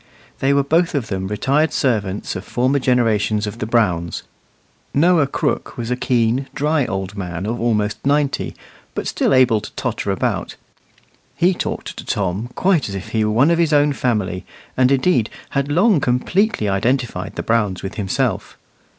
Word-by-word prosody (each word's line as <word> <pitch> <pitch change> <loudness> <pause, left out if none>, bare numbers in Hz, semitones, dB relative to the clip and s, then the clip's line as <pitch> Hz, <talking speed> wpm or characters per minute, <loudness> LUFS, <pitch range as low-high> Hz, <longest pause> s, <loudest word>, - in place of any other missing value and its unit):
They 135 - +2
were 140 0 +3
both 165 +4 +1
of 135 -6 -2
them 95 -1 -2
retired 140 +10 +1
servants 105 -7 -1
of 95 - -5
former 130 +5 +1
generations 110 -4 +1
of 105 +2 -6
the 110 - -3
Browns. 90 -8 0 0.7
Noah 160 0 +4
Crooke - - -2
was 120 0 -4
a - - +2
keen, 125 +1 +1
dry 150 -2 +1
old 95 +1 -4
man 90 -2 -4
of 115 +2 -3
almost 105 -3 0
ninety, 140 0 0 0.4
but - - -3
still - - 0
able 125 -5 +4
to - - -9
totter - - -3
about. - - -1 0.8
He 180 +2 +3
talked - - -4
to - - -6
Tom 100 +4 -2
quite 180 - +2
as 100 - -5
if 95 - -6
he 110 -1 0
were 105 - +1
one 125 +9 +4
of 170 - +2
his 165 -2 +2
own 145 0 +4
family, 105 -9 -1 0.3
and 130 +1 +3
indeed 135 -4 +2 0.2
had 140 +1 -1
long 185 +3 +4
completely 145 - +1
identified 100 -1 -1
the - - -3
Browns 105 -5 0
with 95 - -4
himself. 100 -3 -2
120 Hz, 170 wpm, -20 LUFS, 105-140 Hz, 0.8 s, Noah